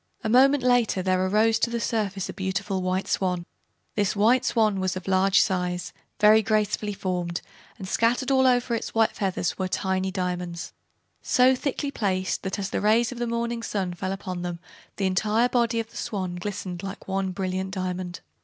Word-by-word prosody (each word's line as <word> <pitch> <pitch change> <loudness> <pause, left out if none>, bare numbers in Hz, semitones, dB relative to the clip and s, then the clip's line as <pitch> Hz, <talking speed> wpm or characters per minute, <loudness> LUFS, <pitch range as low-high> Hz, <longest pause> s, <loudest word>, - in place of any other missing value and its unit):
A 220 - -1
moment 265 +3 +5
later 245 -6 +2
there 185 0 +2
arose 220 +4 +3
to - - +1
the 235 0 -2
surface 200 -5 -1
a - - -6
beautiful 190 0 -2
White 185 +1 -1
Swan. 180 -2 0 0.5
This 205 -2 0 0.3
Swan 215 -4 +1
was 185 -1 -1
of 185 0 -7
large 190 +1 +4
size, 180 -2 0 0.3
very 215 +1 +7
gracefully 210 -1 0
formed, 180 -3 -3 0.4
and 190 -4 -7
scattered 245 +6 +1
all 265 -1 +4
over 245 -1 +2
its 230 - -3
white 225 -1 +4
feathers 190 -2 -2
were 190 - 0
tiny 190 0 -1
diamonds, 180 -2 -4 0.5
so 255 +1 +4
thickly 280 +2 -2
placed 190 -6 -1
that 190 - -3
as 195 -1 -3
the - - -1
rays 220 +3 +3
of 250 - -7
the 240 - -1
morning 235 0 -2
sun 195 -5 -2
fell 185 +2 -4
upon 190 -2 -5
them 175 -1 -4 0.4
the 195 - -1
entire 215 +5 +2
body 235 -2 +1
of 225 0 -5
the - - -11
Swan 185 -4 -3
glistened 185 -1 -5
like 195 0 -7
one 195 0 -1
brilliant 190 0 -3
diamond. 185 -2 -4
195 Hz, 180 wpm, -25 LUFS, 185-225 Hz, 0.5 s, very